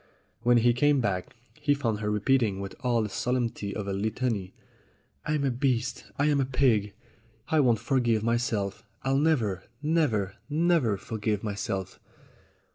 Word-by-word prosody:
When 120 Hz, 0 st, +4 dB
he 120 Hz, +1 st, +4 dB
came 145 Hz, +3 st, +3 dB
back 100 Hz, -6 st, -2 dB, 0.2 s
he 150 Hz, -2 st, +1 dB
found 115 Hz, -7 st, -1 dB
her 105 Hz, -1 st, -2 dB
repeating 105 Hz, -1 st, +2 dB
with 100 Hz, 0 st, -5 dB
all 120 Hz, -3 st, +1 dB
the 105 Hz, -, -3 dB
solemnity 115 Hz, -3 st, -2 dB
of 105 Hz, -2 st, -4 dB
a 100 Hz, -, -1 dB
Litany: 105 Hz, -1 st, -1 dB, 0.8 s
"I'm 150 Hz, -1 st, 0 dB
a 135 Hz, -, +2 dB
beast. 130 Hz, -1 st, -1 dB
I 145 Hz, -, +2 dB
am 145 Hz, -2 st, +3 dB
a -, -, +1 dB
pig. 120 Hz, -6 st, +2 dB, 0.6 s
I 160 Hz, -, +3 dB
won't 120 Hz, -5 st, +4 dB
forgive 120 Hz, -1 st, +1 dB
myself. 110 Hz, -3 st, -1 dB, 0.2 s
I'll 135 Hz, +1 st, +2 dB
never, 115 Hz, -, +1 dB, 0.2 s
never, 140 Hz, -, +1 dB
never 155 Hz, -, +2 dB
forgive 105 Hz, 0 st, -2 dB
myself." 100 Hz, -3 st, -3 dB
120 Hz, 150 wpm, -28 LUFS, 105-135 Hz, 0.8 s, When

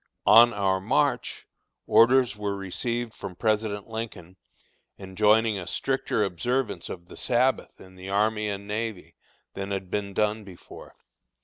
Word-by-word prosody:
On 120 Hz, +1 st, +8 dB
our 95 Hz, -3 st, 0 dB
march, -, -, 0 dB, 0.4 s
orders 125 Hz, -2 st, +4 dB
were 105 Hz, -1 st, -3 dB
received 115 Hz, +5 st, -3 dB
from 90 Hz, -, -8 dB
President 105 Hz, -1 st, -1 dB
Lincoln 110 Hz, -6 st, -7 dB, 0.6 s
enjoining 105 Hz, +2 st, +2 dB
a 90 Hz, -, -8 dB
stricter 135 Hz, -5 st, -1 dB
observance 115 Hz, +6 st, -2 dB
of 85 Hz, -1 st, -8 dB
the -, -, -12 dB
Sabbath 130 Hz, +2 st, 0 dB
in 95 Hz, 0 st, -15 dB
the 95 Hz, +1 st, -10 dB
army 105 Hz, +1 st, +1 dB
and 100 Hz, 0 st, -5 dB
navy, 105 Hz, -2 st, -4 dB, 0.4 s
than 100 Hz, 0 st, -5 dB
had 95 Hz, -2 st, -4 dB
been 100 Hz, -1 st, -3 dB
done 105 Hz, 0 st, 0 dB
before. 95 Hz, -3 st, -13 dB
105 Hz, 135 wpm, -26 LUFS, 95-115 Hz, 0.6 s, On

